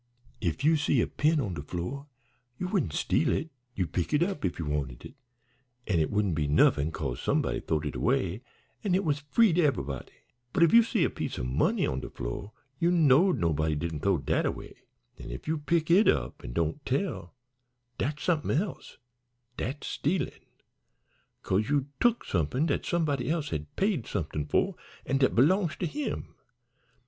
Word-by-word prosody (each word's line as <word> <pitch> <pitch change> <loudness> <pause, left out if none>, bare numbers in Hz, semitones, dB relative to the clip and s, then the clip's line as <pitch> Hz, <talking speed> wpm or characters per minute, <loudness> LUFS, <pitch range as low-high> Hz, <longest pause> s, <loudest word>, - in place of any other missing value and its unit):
If 85 - -1
you 160 +2 +5
see 145 -3 +2
a - - +3
pin 155 +1 +1
on 105 -9 -2
de 75 - -5
fl'or 90 - -5 0.5
you 180 - -3
wouldn't 180 - 0
steal - - +1
it, 160 +3 -2 0.2
you'd 90 -4 -2
pick 90 - 0
it 150 - +4
up 185 -4 -3
if 95 - -1
you 85 - -3
wanted 70 -5 -3
it, - - -10 0.7
an' 90 -6 +1
it 80 - +1
wouldn't 105 -3 +1
be 75 -2 0
nuffin, 75 +1 +3
'cause 70 -6 -4
somebody - - 0
th'owed 80 0 -1
it 75 - -3
away 95 +4 0 0.4
an' 195 -4 +2
it 195 - +1
was 150 -2 +1
free 175 +8 +3
to 175 - +3
eve'body; 70 - -1 0.4
but - - +4
if 170 - +4
you 235 - +9
see 225 -4 +1
a - - +3
piece - - -4
o' - - -3
money 65 +2 +1
on 65 - -1
de - - -7
fl'or, 60 - -5 0.3
you 170 - +3
knowed 170 +1 +5
nobody 80 -2 +1
didn't 80 0 -3
th'ow 95 +2 +2
dat 70 - 0
away, - - -5 0.5
an' - - -8
if - - -8
you 160 0 0
pick 165 +2 0
it 200 +5 +6
up 65 -1 +1
an' - - -6
don't 85 - -1
tell, 135 - -2 0.6
dat's 150 +4 -2
somethin' 155 -4 +1
else 190 -2 -6 0.6
dat's 135 +6 -4
stealin', 175 +6 -1 1.1
'cause 105 +5 0
you 145 -1 +1
tuk 240 -1 +2
somethin' 90 - 0
dat 145 - -1
somebody 145 -7 0
else 160 -2 -1
has 75 - -2
paid 190 - 0
somethin' 75 -6 -3
for - - +1 0.3
an' 135 +1 +1
dat 130 - +3
belongs 170 - +3
to - - -3
him. 290 - -4
135 Hz, 185 wpm, -29 LUFS, -, 1.1 s, you